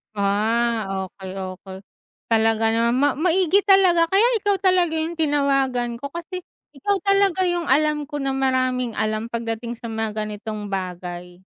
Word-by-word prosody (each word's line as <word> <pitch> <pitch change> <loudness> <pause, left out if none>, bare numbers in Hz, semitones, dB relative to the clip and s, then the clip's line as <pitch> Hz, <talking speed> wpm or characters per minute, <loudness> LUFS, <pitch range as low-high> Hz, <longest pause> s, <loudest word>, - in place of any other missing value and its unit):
Ah, 220 +2 +1 0.2
okey, 190 0 -9
okey. 190 0 -7 0.5
Talaga 225 0 +3
naman. 235 +1 +2
Ma 290 - +5
maigi 365 +2 +3
talaga. 360 -4 +5
Kaya 390 +5 +3 0.2
ikaw 405 0 +1
talaga 360 -3 +3
yung 325 +1 -3
tinawagan 270 -5 +1
ko 280 - -5
kasi 340 +4 -6 0.3
ikaw 350 +8 -1
talaga 395 -2 +3
yung 350 -1 -1
alam 300 +1 +2
ko 295 - -7
na 270 - 0
maraming 255 -3 0
alam 215 +1 -1
pagdating 235 0 -4
sa 230 0 -8
mga 220 -1 -2
ganitong 210 -1 -6
bagay. 180 -1 -6
245 Hz, 145 wpm, -22 LUFS, 215-325 Hz, 0.5 s, Ma